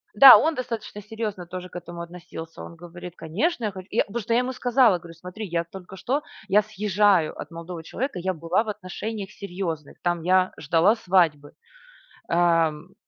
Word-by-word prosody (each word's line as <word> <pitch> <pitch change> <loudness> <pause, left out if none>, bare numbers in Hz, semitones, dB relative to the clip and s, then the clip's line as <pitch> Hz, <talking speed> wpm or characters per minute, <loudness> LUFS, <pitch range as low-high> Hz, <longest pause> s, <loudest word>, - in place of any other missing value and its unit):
Да, 260 +4 +11
он 320 0 +1
достаточно 230 -5 -5
серьезно 210 -3 -5
тоже 180 +1 -7
к - - -18
этому 175 -1 -7
относился. 170 -1 -9
Он 170 - -10
говорит: 175 +1 -10
"Конечно, 225 - -1
я 210 - -1
хочу". 190 0 -10
Я 225 - +3
просто 230 +2 -3
я 235 - +4
ему 250 +1 -2
сказала, 245 -5 +4
говорю: 170 -1 -12
"Смотри, 180 +6 -8
я 170 -1 -1
только 185 +2 -11
что 270 +8 -1 0.2
я 205 +2 +5
съезжаю 205 -5 +2
от - - -7
молодого 165 0 -7
человека, 260 - -4
я 185 +2 -1
была 170 +5 0
в 220 - -6
отношениях 205 +1 -5
серьезных, 175 -7 -5
там 175 -1 0
я 185 +1 +3
ждала 165 +8 +3
свадьбы. 170 -8 +1 0.8
Эм. 170 0 +2
185 Hz, 175 wpm, -25 LUFS, 170-215 Hz, 0.8 s, Да